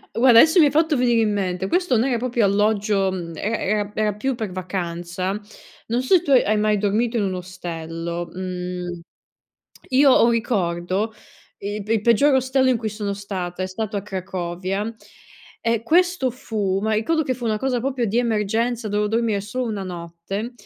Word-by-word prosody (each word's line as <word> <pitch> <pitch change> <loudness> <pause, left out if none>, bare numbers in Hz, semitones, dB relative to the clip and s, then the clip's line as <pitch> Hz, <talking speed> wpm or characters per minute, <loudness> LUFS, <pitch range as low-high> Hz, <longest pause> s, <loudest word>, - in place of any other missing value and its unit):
guarda, 235 -1 +7
adesso 320 +7 +6
mi 315 - +8
hai 285 - +3
fatto 315 0 +2
venire 240 -3 +3
in 215 -2 +1
mente, 190 -2 -1
questo 350 - +2
non 235 +4 +2
era 245 - +1
proprio 240 -2 +1
alloggio, 205 -1 +2 0.2
era 210 +8 -2
era 205 +1 0
era 215 -1 +1
più 250 +5 -2
per 220 -5 -4
vacanza. 180 0 -3 0.6
Non 235 +2 0
so 255 - +1
se 355 - +4
tu 330 - -7
hai 215 -5 +4
mai 210 0 +2
dormito 220 +4 0
in 210 - +1
un 190 - -1
ostello, 170 -2 -5
mhmm, 180 -1 -5 0.9
io 270 +1 +5
ho 250 - +6
un - - +4
ricordo, 200 -2 -1 0.4
i 205 +1 -5
il 210 - -4
p - - -16
il 225 -1 +2
peggiore 265 +5 +4
ostello 260 0 +2
in 255 - +3
cui 220 -1 -3
sono 205 -1 -3
stata, 190 -3 -5
è - - -1
stato 205 +3 -4
a 200 - -2
Cracovia, 190 +2 -4 0.7
e 230 -1 +1
questo 350 0 +2
fu 210 -6 -2
ma 220 +1 0
ricordo 315 +10 +1
che 265 - -1
fu 245 -1 -5
una 215 -1 0
cosa 255 0 0
proprio 260 -1 -1
di 225 +2 0
emergenza, 230 0 0
dovevo 210 0 0
dormire 225 -2 0
solo 230 +6 -3
1 210 -4 -3
notte, 175 +5 -6
210 Hz, 190 wpm, -22 LUFS, 190-240 Hz, 0.9 s, mi